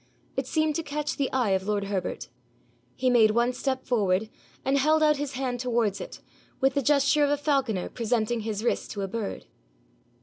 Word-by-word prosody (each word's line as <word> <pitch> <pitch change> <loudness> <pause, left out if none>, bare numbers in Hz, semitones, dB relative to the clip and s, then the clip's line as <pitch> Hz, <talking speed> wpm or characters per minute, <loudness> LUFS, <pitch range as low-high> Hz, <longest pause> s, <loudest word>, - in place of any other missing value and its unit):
It - - -2
seemed 310 -1 +1
to - - -1
catch 295 -1 -3
the 275 -2 0
eye 250 -6 +1
of 190 +1 0
lord 205 -1 0
Herbert. 195 -2 -3 0.7
He 255 0 +1
made 225 -3 +6
one 235 +3 +2
step 260 0 -2
forward, 215 -3 +1 0.3
and 275 +1 +2
held 310 +3 +3
out 300 -1 +4
his 285 -1 -4
hand 250 -1 -2
towards 235 -5 0
it, - - -8 0.4
with 270 0 +3
the 280 - +1
gesture 285 +2 +3
of 285 - +3
a 290 - +2
falconer 270 - 0
presenting 230 0 -1
his 215 -1 -3
wrist 240 - 0
to 205 - -4
a - - -2
bird. 210 +1 -4
250 Hz, 195 wpm, -27 LUFS, 215-280 Hz, 0.7 s, made